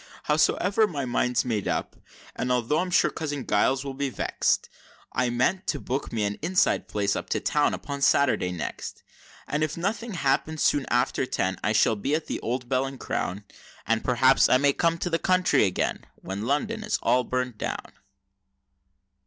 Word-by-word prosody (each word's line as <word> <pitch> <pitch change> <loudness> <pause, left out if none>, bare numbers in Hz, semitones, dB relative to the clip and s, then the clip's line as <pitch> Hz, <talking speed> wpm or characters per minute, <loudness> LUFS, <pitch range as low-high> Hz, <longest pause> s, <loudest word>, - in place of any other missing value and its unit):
Howsomever 185 +8 +2
my 145 -8 -3
mind's 125 0 +1
made 110 -5 -1
up, - - -2 0.4
and 125 - -2
although 125 +5 +1
I'm 185 - -1
sure 180 - +3
cousin 145 -4 -4
Giles 130 +6 +1
will 135 - -4
be 140 +1 -2
vext, - - 0 0.5
I 125 0 +1
mean 130 +10 +1
to 145 - -1
book 135 +2 -3
me 110 -2 -1
an 100 0 -2
inside 175 +4 +1
place 100 -1 0
up - - -5
to - - 0
town - - +1
upon 140 0 -6
Saturday 130 -9 +3
next, 90 - -6 0.4
And 150 +1 0
if 155 +1 -2
nothing 205 +5 -2
happens, 155 0 0
soon 145 -2 +2
after 125 +1 +1
ten, 95 -5 -1
I 110 - +1
shall 110 - +4
be 135 +8 -1
at 160 - -2
the - - -4
Old 125 +1 -3
Bell 130 +1 +1
and 135 -1 -8
Crown, 100 -1 -3 0.4
And 115 -1 +1
perhaps 130 +2 +4
I 130 - +6
may 140 +1 +3
come 165 +2 +1
to 175 - -2
the 165 - +1
country 185 -10 +3
again, 95 - -2
when 100 +4 -5
London 215 - -1
is 215 0 0
all 125 +1 +3
burnt 125 -2 -3
down! - - -4
135 Hz, 185 wpm, -26 LUFS, 120-155 Hz, 0.5 s, I